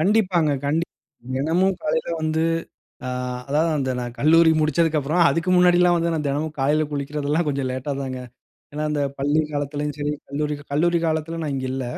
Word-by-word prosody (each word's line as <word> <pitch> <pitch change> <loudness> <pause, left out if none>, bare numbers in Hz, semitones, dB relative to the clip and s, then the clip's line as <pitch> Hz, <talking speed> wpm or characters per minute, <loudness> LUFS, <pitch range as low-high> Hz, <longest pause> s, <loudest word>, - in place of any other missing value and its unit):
கண்டிப்பாங்க, 185 -4 +2 0.2
கண்டிப்பா. 160 +4 +1 0.5
தினமும் 175 +7 +1
காலையில 480 +9 -1
வந்து 160 +1 +1 0.6
அ, - - -3 0.4
அதாவது 155 +4 +2
அந்த 135 -2 -1
நான் 120 -1 -4
கல்லூரி 165 +2 +5
முடித்ததுக்கப்புறம். 155 +1 +2
அதுக்கு 165 +2 0
முன்னாடிலாம் 180 0 +5
வந்து 170 0 0
நான் 155 -2 -2
தினமும் 145 +3 -1
காலையில 145 +3 +2
குளிக்கிறதெல்லாம் 145 +2 -1
கொஞ்சம் 140 -2 -1
லேட்டா 130 +3 -3
தாங்க. 130 -2 -4 0.5
ஏன்னா 150 +1 -3
அந்த 150 -1 -1 0.2
பள்ளி 145 +3 +2
காலத்துலேயும் 145 0 -3
சரி, 145 0 -1 0.2
கல்லூரி, 150 +1 -2 0.2
கல்லூரி 170 +4 +2
காலத்துல 160 +1 -1
நான் 150 -2 -2
இங்க 130 -1 -3
இல்ல. 130 0 -3
150 Hz, 160 wpm, -23 LUFS, 145-165 Hz, 0.6 s, கல்லூரி